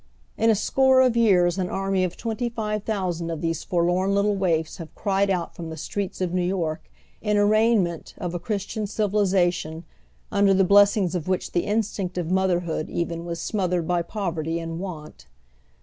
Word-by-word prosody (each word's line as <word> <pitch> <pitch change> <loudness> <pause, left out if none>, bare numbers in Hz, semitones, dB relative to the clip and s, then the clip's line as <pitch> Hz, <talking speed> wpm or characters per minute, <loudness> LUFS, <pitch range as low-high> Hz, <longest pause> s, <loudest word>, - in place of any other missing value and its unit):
In 225 - +2
a 220 - +5
score 265 +5 +3
of 255 -2 +3
years 190 -6 +3
an 180 -1 -1
army 195 -1 0
of 180 -1 -3
twenty 235 +1 -2
five 215 -2 -3
thousand 180 -6 -2
of 165 -2 -3
these 165 -2 -2
forlorn 180 +3 +1
little 200 +1 +2
waifs 165 -5 0
have 165 - -7
ci 210 - -4
ied 195 +1 +2
out 180 -3 -1
from 165 -2 -6
the 160 - -7
streets 190 +5 -4
of 180 -1 -1
New 180 - +1
York 175 - -2 0.3
in 210 0 +1
arraignment 205 -4 +2
of 175 -1 -4
a 175 - -2
Christian 210 +2 -3
civilization 190 -6 0 0.5
under 200 -1 +4
the 195 - +4
blessings 200 -1 +4
of 175 -3 -3
which 185 -1 -1
the 175 - 0
in 215 +2 +2
stinct 190 -4 -5
of 175 -1 -2
motherhood 175 -4 0
even 170 0 -3
was 170 -1 -4
smothered 180 -4 -1
by 175 -1 +1
poverty 170 -4 -3
and 165 0 -5
want. 155 - -8
185 Hz, 185 wpm, -24 LUFS, 170-205 Hz, 0.5 s, a